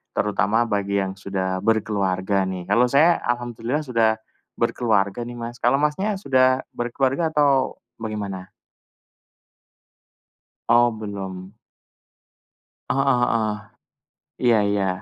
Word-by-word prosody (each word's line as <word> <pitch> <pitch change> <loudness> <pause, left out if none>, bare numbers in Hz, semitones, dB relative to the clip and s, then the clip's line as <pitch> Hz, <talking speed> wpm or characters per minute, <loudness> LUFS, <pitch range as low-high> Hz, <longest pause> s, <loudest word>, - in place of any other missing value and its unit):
terutama 105 +2 +1
bagi 100 -1 0
yang 95 0 -3
sudah 95 -1 -3
berkeluarga 100 -3 +1
nih. 90 -2 -5
Kalau 120 +4 +4
saya 160 +6 +5
alhamdulillah 120 +3 -2
sudah 115 -4 +2 0.5
berkeluarga 115 -3 +1
nih, 120 0 -8
Mas. 120 +1 -6
Kalau 125 +3 +4
Masnya 190 +8 0
sudah 130 -5 +3
berkeluarga 135 +6 0
atau 140 -3 +2 0.2
bagaimana? 100 -4 -5 2.2
Oh, 120 +1 +5
belum. 100 -2 -7 1.4
Heeh 135 +1 +1 0.3
heeh. 110 -2 0 0.9
Iya 115 -2 +5
iya. 100 -1 +1
115 Hz, 100 wpm, -23 LUFS, 100-125 Hz, 2.2 s, saya